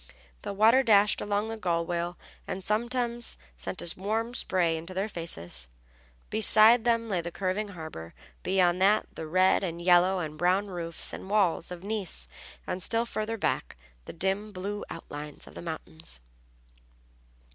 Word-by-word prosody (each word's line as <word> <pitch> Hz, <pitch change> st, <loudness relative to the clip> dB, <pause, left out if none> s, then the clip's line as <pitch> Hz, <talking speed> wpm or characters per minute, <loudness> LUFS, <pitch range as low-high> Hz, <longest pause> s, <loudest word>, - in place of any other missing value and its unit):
The -, -, -4 dB
water 220 Hz, +6 st, +5 dB
dashed 210 Hz, -4 st, +4 dB
along 205 Hz, +1 st, -1 dB
the 225 Hz, -, -4 dB
gunwale 175 Hz, -2 st, -1 dB, 0.3 s
and 190 Hz, -, -4 dB
sometimes 235 Hz, +3 st, 0 dB, 0.2 s
sent -, -, -5 dB
a 170 Hz, -, +2 dB
warm 225 Hz, +4 st, -1 dB
spray 175 Hz, -8 st, +1 dB
into 170 Hz, +3 st, -6 dB
their 195 Hz, +3 st, 0 dB
faces. 85 Hz, -, -3 dB, 0.6 s
Behind 220 Hz, +2 st, +6 dB
them 230 Hz, -1 st, +2 dB
lay 190 Hz, -5 st, 0 dB
the 170 Hz, -, -5 dB
curving 190 Hz, +4 st, -2 dB
harbor, 160 Hz, -, -8 dB, 0.3 s
beyond 180 Hz, -1 st, +2 dB
that 205 Hz, +3 st, +4 dB
the 160 Hz, -, -6 dB
red 185 Hz, +4 st, +3 dB
and 170 Hz, -2 st, -3 dB
yellow 180 Hz, +2 st, +5 dB
and 155 Hz, -3 st, -4 dB
brown 185 Hz, +3 st, +2 dB
roofs 170 Hz, -3 st, -4 dB
and 190 Hz, -, -7 dB
walls 195 Hz, -6 st, +2 dB
of 180 Hz, 0 st, -8 dB
Nice, 195 Hz, -, -2 dB, 0.4 s
and 185 Hz, -, -3 dB
still 230 Hz, +5 st, 0 dB
farther 225 Hz, -1 st, -3 dB
back -, -, -1 dB, 0.3 s
the -, -, -8 dB
dim 195 Hz, +5 st, 0 dB
blue 205 Hz, +2 st, -4 dB
outlines 150 Hz, 0 st, -8 dB
of -, -, -14 dB
the -, -, -8 dB
mountains. 160 Hz, -, -6 dB
190 Hz, 155 wpm, -28 LUFS, 170-215 Hz, 0.6 s, Behind